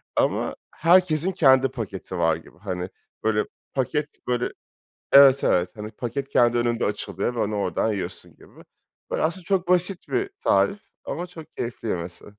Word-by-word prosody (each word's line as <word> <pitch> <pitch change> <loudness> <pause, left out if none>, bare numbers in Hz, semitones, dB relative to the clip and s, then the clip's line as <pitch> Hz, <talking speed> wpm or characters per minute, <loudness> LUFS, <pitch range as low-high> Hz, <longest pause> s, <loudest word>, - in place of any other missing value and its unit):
ama - - +1 0.2
herkesin 175 0 +3
kendi 135 -5 +5
paketi 100 -7 -6
var 80 -2 +3
gibi. 80 0 -14
Hani, 90 -1 -4 0.3
böyle, 105 -1 +1 0.3
paket 145 +3 -2
böyle, 125 -1 0 0.6
evet, 140 -1 +8
evet, 90 0 +2
hani, 105 +1 -6
paket 135 +4 -4
kendi 120 -3 +3
önünde 120 -1 0
açılıyor 115 +3 -2
ve - - -5
onu 105 0 -1
oradan 100 +3 0
yiyorsun 100 - -6
gibi. - - -17 0.5
Böyle, - - -1
aslında 170 +3 -1
çok 185 -1 0
basit 180 +1 +2
bir 390 +1 -1
tarif 200 +1 +2 0.2
ama 175 +2 -4
çok 165 -4 -13
keyifli 115 -1 -4
yemesi. 85 -1 -4
125 Hz, 155 wpm, -24 LUFS, 105-165 Hz, 0.6 s, evet